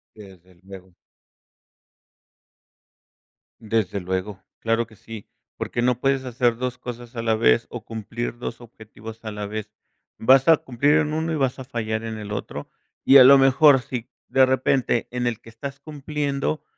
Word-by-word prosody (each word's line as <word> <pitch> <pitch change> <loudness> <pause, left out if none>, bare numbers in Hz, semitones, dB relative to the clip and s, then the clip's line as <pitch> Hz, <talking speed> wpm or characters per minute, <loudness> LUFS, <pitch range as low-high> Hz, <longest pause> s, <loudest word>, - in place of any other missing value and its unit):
Desde 95 -4 -15
luego. 95 -2 -13 2.7
Desde 110 -3 -1
luego. 95 +2 -4 0.2
Claro 115 0 0
que 110 - -18
sí, 110 0 -11 0.3
porque 120 - -3
no 125 0 +1
puedes 135 0 +1
hacer 120 -2 0
2 125 0 -3
cosas 120 -1 -9
a 115 - -3
la 110 -1 +1
vez, 115 +1 +3
o 120 -3 -8
cumplir 115 +2 -5
2 120 - -6
objetivos 110 -1 -12
a 110 - -5
la 105 0 -5
vez. 110 +1 -6 0.5
Vas 130 +4 +4
a 160 -2 +7
cumplir 135 +4 +1
en 150 0 -1
1 160 +1 -1
y - - -1
vas 135 -2 -1
a - - -6
fallar 110 -3 -3
en 110 -1 -5
el 105 -1 -8
otro, 105 - -6 0.4
y 135 - +8
a 130 - +10
lo 140 +2 +9
mejor 135 0 +5
si 120 -1 -6 0.2
de 130 0 +5
repente 130 -2 +1
en 125 0 -2
el 115 -3 -2
que 115 - -14
estás 135 +5 -8
cumpliendo 150 0 -3
120 Hz, 170 wpm, -23 LUFS, 110-135 Hz, 2.7 s, a